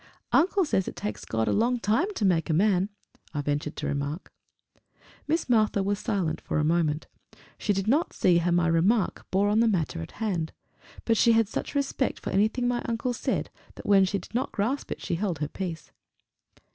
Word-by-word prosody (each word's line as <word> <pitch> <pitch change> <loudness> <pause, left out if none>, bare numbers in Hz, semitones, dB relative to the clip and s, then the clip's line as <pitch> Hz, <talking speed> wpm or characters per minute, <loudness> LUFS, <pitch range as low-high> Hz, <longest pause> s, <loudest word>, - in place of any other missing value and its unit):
"Uncle 380 +2 +3
says 190 - 0
it - - -5
takes 105 +1 -5
God 110 0 -1
a - - +2
long 240 +3 +2
time 230 - +1
to 210 - 0
make 175 -3 +2
a 160 - +2
man!" 195 +1 +3 0.5
I 145 - 0
ventured 145 +1 -2
to - - -4
remark. 145 +4 -3 1.0
Miss 325 +3 0
Martha 215 -4 +3
was 200 +1 -1
silent 195 -8 -1
for - - -2
a 150 - +2
moment. 160 -1 +1 0.5
She 210 - 0
did 195 0 -1
not 295 +9 +2
see 175 -2 +3
how 175 +1 0
my 175 0 +3
remark 175 +6 +1
bore 195 +2 +2
on 210 +2 +3
the 230 - +4
matter 165 - 0
in 80 - -7
hand, 185 -8 -2 0.5
but 225 -1 +2
she 235 - +5
had 225 -2 +3
such 220 - -5
respect 275 -1 0
for - - -5
anything 220 +6 +2
my 245 0 0
uncle 235 +2 -1
said, - - -2 0.2
that - - -11
when 195 -1 +5
she 190 +1 0
did 190 - -11
not 250 +3 -1
grasp 235 +8 -1
it - - -4
she - - -2
held 180 -1 -1
her 150 0 -2
peace. 170 -1 -6
195 Hz, 205 wpm, -27 LUFS, 165-230 Hz, 1.0 s, she